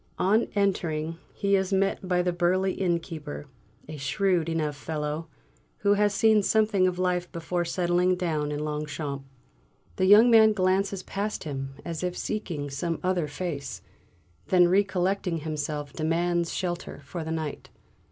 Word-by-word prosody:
On 205 Hz, +5 st, +3 dB
entering, 165 Hz, -5 st, 0 dB
he 200 Hz, 0 st, +1 dB
is 190 Hz, 0 st, 0 dB
met 195 Hz, 0 st, +1 dB
by 180 Hz, -1 st, +2 dB
the 180 Hz, 0 st, 0 dB
burly 185 Hz, +2 st, +1 dB
innkeeper, 165 Hz, -5 st, -3 dB, 0.4 s
a 155 Hz, 0 st, -7 dB
shrewd 165 Hz, +4 st, +1 dB
enough 155 Hz, -3 st, -1 dB
fellow, 150 Hz, +1 st, -4 dB, 0.5 s
who 200 Hz, 0 st, +4 dB
has 205 Hz, 0 st, +3 dB
seen 215 Hz, +1 st, +4 dB
something 210 Hz, -2 st, +3 dB
of 180 Hz, -1 st, -1 dB
life 180 Hz, -1 st, 0 dB
before 175 Hz, +1 st, -2 dB
settling 175 Hz, +1 st, +2 dB
down 155 Hz, -5 st, -1 dB
in 150 Hz, +1 st, -2 dB
Longchamps. 150 Hz, -2 st, -4 dB, 0.7 s
The 185 Hz, -, +2 dB
young 215 Hz, +5 st, +8 dB
man 220 Hz, -1 st, +7 dB
glances 190 Hz, 0 st, +1 dB
past 205 Hz, +2 st, -3 dB
him 135 Hz, -2 st, -5 dB
as 165 Hz, -2 st, -4 dB
if 180 Hz, 0 st, -2 dB
seeking 155 Hz, -9 st, -3 dB
some 165 Hz, +4 st, -2 dB
other 180 Hz, -4 st, +1 dB
face, 145 Hz, -1 st, -5 dB, 0.6 s
then 180 Hz, -2 st, +5 dB
recollecting 190 Hz, -2 st, +1 dB
himself 150 Hz, -2 st, -4 dB
demands 170 Hz, +1 st, 0 dB
shelter 175 Hz, -4 st, -4 dB
for 170 Hz, +3 st, -5 dB
the 160 Hz, -, -6 dB
night. 160 Hz, -2 st, -4 dB
175 Hz, 145 wpm, -27 LUFS, 155-190 Hz, 0.7 s, young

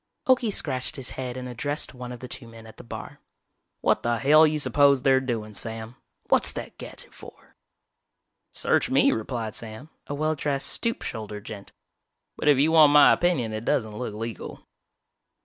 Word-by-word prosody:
Okie 255 Hz, -4 st, +3 dB
scratched 130 Hz, -9 st, -1 dB
his 135 Hz, -3 st, -4 dB
head 125 Hz, -1 st, -5 dB
and 125 Hz, 0 st, -6 dB
addressed 145 Hz, +6 st, -3 dB
one 125 Hz, -1 st, -8 dB
of 125 Hz, -, -9 dB
the 125 Hz, -, -7 dB
two 125 Hz, -1 st, -8 dB
men 115 Hz, -1 st, -13 dB
at 110 Hz, -, -14 dB
the -, -, -11 dB
bar. 115 Hz, -, -9 dB, 0.6 s
"What -, -, +2 dB
the 120 Hz, 0 st, 0 dB
hell 150 Hz, +6 st, +6 dB
you 155 Hz, 0 st, -1 dB
suppose 140 Hz, -1 st, +3 dB
they're 135 Hz, -1 st, +4 dB
doin', 115 Hz, -5 st, -4 dB
Sam? 110 Hz, +2 st, -5 dB, 0.3 s
What's -, -, +4 dB
that -, -, -8 dB
gadget -, -, -11 dB
for?" -, -, -15 dB, 1.0 s
"Search -, -, +1 dB
me," -, -, +4 dB
replied 110 Hz, -1 st, -3 dB
Sam, 115 Hz, +8 st, -9 dB, 0.2 s
a 145 Hz, -, -4 dB
well 155 Hz, +2 st, 0 dB
dressed, 140 Hz, -2 st, -2 dB
stoop 230 Hz, -1 st, -2 dB
shouldered 105 Hz, -2 st, -6 dB
gent, 100 Hz, -2 st, -9 dB, 0.6 s
"but -, -, -4 dB
if 145 Hz, -2 st, +6 dB
you 150 Hz, +4 st, +3 dB
want 155 Hz, -3 st, +7 dB
my 145 Hz, 0 st, +7 dB
opinion 145 Hz, -11 st, 0 dB
it 110 Hz, +1 st, -4 dB
doesn't 115 Hz, -6 st, -1 dB
look 115 Hz, -2 st, -5 dB
legal." 115 Hz, +1 st, -7 dB
125 Hz, 180 wpm, -25 LUFS, 115-145 Hz, 1.0 s, want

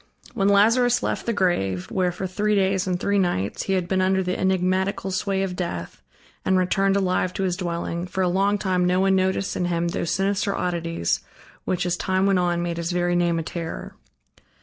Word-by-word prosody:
I -, -, -25 dB
When 195 Hz, +1 st, +2 dB
Lazarus 230 Hz, +5 st, +4 dB
left -, -, -2 dB
the -, -, +2 dB
grave, 95 Hz, -, 0 dB
where, 180 Hz, -2 st, +1 dB
for 185 Hz, +2 st, -5 dB
three 210 Hz, +3 st, 0 dB
days 190 Hz, -1 st, +1 dB
and 180 Hz, -1 st, 0 dB
three 200 Hz, +1 st, +1 dB
nights 105 Hz, -, -1 dB
he 195 Hz, -, -1 dB
had 185 Hz, -2 st, 0 dB
been 185 Hz, 0 st, +1 dB
under 190 Hz, 0 st, +2 dB
the 180 Hz, 0 st, -1 dB
enigmatical 190 Hz, +1 st, 0 dB
sway 195 Hz, +1 st, 0 dB
of 185 Hz, -2 st, -3 dB
death, 130 Hz, -, -5 dB, 0.4 s
and 190 Hz, 0 st, +2 dB
returned 195 Hz, +2 st, +2 dB
alive 185 Hz, -2 st, +1 dB
to 195 Hz, -, -1 dB
his 180 Hz, -2 st, 0 dB
dwelling, 170 Hz, -1 st, -3 dB
for 190 Hz, +1 st, -1 dB
a -, -, +2 dB
long 195 Hz, +3 st, +2 dB
time 185 Hz, -2 st, 0 dB
no 180 Hz, +1 st, +2 dB
one 190 Hz, 0 st, +3 dB
noticed 190 Hz, +1 st, 0 dB
in 180 Hz, -, -1 dB
him 170 Hz, -1 st, 0 dB
those 170 Hz, -, -2 dB
sinister 195 Hz, +1 st, 0 dB
oddities, 170 Hz, -, -1 dB, 0.5 s
which, 180 Hz, -1 st, -1 dB
as 175 Hz, 0 st, 0 dB
time 190 Hz, +1 st, 0 dB
went 195 Hz, -2 st, +3 dB
on, 175 Hz, -1 st, 0 dB
made 170 Hz, -1 st, -3 dB
his 170 Hz, +1 st, -2 dB
very 175 Hz, 0 st, +1 dB
name 175 Hz, -1 st, +2 dB
a 165 Hz, -, -2 dB
terror. 165 Hz, 0 st, -6 dB
185 Hz, 210 wpm, -24 LUFS, 175-195 Hz, 0.5 s, Lazarus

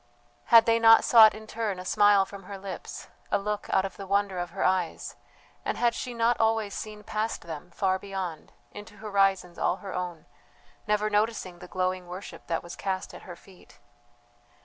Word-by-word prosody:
Had 230 Hz, -2 st, +7 dB
they 230 Hz, 0 st, +3 dB
not 225 Hz, 0 st, +7 dB
sought 220 Hz, -3 st, +7 dB
in 220 Hz, 0 st, -10 dB
turn 215 Hz, -3 st, -3 dB
a 180 Hz, -, -8 dB
smile 205 Hz, 0 st, +4 dB
from 195 Hz, -1 st, -11 dB
her 200 Hz, +1 st, -7 dB
lips, 190 Hz, -1 st, -8 dB, 0.2 s
a -, -, +2 dB
look 210 Hz, +1 st, -3 dB
out 190 Hz, -, +3 dB
of 195 Hz, -, -7 dB
the 195 Hz, -, -8 dB
wonder 200 Hz, -1 st, 0 dB
of 175 Hz, 0 st, -3 dB
her 190 Hz, +3 st, -4 dB
eyes, 185 Hz, -3 st, -1 dB, 0.5 s
and -, -, -2 dB
had 240 Hz, -1 st, +2 dB
she 250 Hz, -, -5 dB
not 230 Hz, +1 st, +2 dB
always 220 Hz, -2 st, +1 dB
seen 210 Hz, -1 st, -7 dB
past 215 Hz, +2 st, -3 dB
them, 165 Hz, 0 st, -8 dB
far 190 Hz, +1 st, 0 dB
beyond, 185 Hz, -5 st, -6 dB, 0.2 s
into 205 Hz, 0 st, -11 dB
horizons 195 Hz, -4 st, 0 dB
all -, -, +1 dB
her 195 Hz, -1 st, -8 dB
own, 175 Hz, -3 st, -5 dB, 0.6 s
never 210 Hz, 0 st, +1 dB
noticing 210 Hz, -4 st, -1 dB
the -, -, -10 dB
glowing 185 Hz, 0 st, -2 dB
worship 185 Hz, +3 st, -9 dB
that 165 Hz, -1 st, -2 dB
was 175 Hz, -, -8 dB
cast 190 Hz, -1 st, -4 dB
at -, -, -10 dB
her 175 Hz, -, -7 dB
feet? 185 Hz, +1 st, -19 dB
200 Hz, 190 wpm, -27 LUFS, 185-215 Hz, 0.6 s, Had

